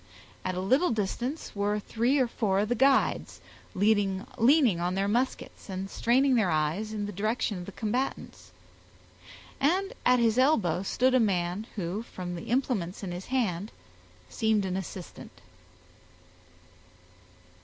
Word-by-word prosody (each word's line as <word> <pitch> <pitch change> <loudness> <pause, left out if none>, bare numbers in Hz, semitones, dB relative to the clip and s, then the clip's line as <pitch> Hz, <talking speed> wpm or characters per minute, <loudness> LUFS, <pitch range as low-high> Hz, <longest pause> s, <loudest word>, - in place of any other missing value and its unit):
At 185 0 -2
a - - -2
little 260 - +3
distance 240 +8 -3
were 205 +1 0
three 235 +6 0
or 260 - +3
four 210 -5 0
of 210 - -2
the - - +3
guides, 265 +3 +2 0.4
leaning 200 -1 +2 0.5
on 175 +1 -1
their 195 +1 0
muskets, 240 0 -2
and 190 +1 -5
straining 260 +3 +3
their 220 -7 +3
eyes 160 +8 0
in 210 -1 -3
the 205 - -5
direction 210 0 -1
of 175 - -8
the - - -6
combatants, 235 +6 -3 1.1
and 370 +8 +1
at 250 0 +5
his 230 0 +2
elbow 215 - +3
stood 255 +6 +1
a 255 - +5
man 190 -1 0
who, 190 +1 -3
from 180 -6 -7
the 170 - -7
implements 220 -8 -1
in 185 - -4
his 180 +1 -7
hand, 215 -6 -1 0.6
seemed 220 -3 +1
an 185 -1 -2
assistant. 190 -1 -8
210 Hz, 145 wpm, -28 LUFS, 190-245 Hz, 1.1 s, at